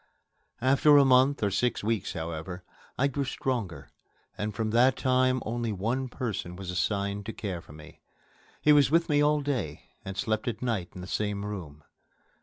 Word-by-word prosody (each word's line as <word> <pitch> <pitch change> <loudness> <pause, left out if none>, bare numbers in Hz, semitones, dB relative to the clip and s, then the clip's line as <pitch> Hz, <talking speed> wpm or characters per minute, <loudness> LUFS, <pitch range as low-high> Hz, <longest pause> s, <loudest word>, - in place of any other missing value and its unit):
After 140 +3 +5
a 140 - +7
month 130 0 +4
or 100 - +2
six 120 +4 0
weeks, 110 -1 -1
however, 80 +2 -5 0.3
I 135 - +2
grew 140 0 0
stronger, 110 - -3 0.4
and 105 +1 -3
from 110 +1 -2
that 125 +3 +4
time 130 -1 +2
only 115 0 -2
one 115 +7 -1
person 110 -8 -4
was 95 -1 -6
assigned 100 +3 -1
to 110 - -4
care 95 -5 -4
for 75 - -15
me. 75 0 -14 0.6
He 150 - +6
was 145 -2 +5
with 165 +3 +2
me 145 -1 +3
all 150 0 +3
day, 125 - -3
and 95 0 -7
slept 110 +1 -1
at 120 - -3
night 110 -8 -1
in 90 - -7
the - - -7
same 105 0 -2
room. 80 -8 -7
110 Hz, 180 wpm, -28 LUFS, 95-130 Hz, 0.6 s, a